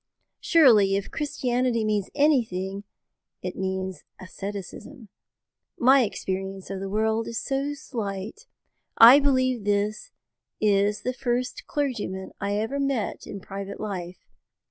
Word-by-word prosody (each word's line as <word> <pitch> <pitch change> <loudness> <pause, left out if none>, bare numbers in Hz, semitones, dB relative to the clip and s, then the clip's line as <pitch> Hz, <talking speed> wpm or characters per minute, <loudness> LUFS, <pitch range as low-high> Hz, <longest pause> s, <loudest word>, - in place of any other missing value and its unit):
Surely, 225 - +5
if 200 0 -3
Christianity 250 -5 -1
means 210 -2 0
anything 205 -10 +1 0.6
it 180 0 -4
means 190 -1 -3 0.2
asceticism. 200 +6 -8 0.7
My 265 +3 +6
experience 195 -3 -4
of 195 - -4
the 195 0 -5
world 220 +2 0
is 230 - -4
so 280 +2 -2
slight. 220 - -6 0.5
I 240 +5 +10
believe 255 -4 +1
this 205 +1 -1 0.5
is 205 0 +2
the 255 - -1
first 250 -1 -2
clergyman 225 -10 -3
I 200 +1 -1
ever 225 +7 -2
met 275 -6 -2
in 200 - -7
private 195 +1 -7
life. 185 -4 -5
215 Hz, 120 wpm, -25 LUFS, 195-255 Hz, 0.7 s, I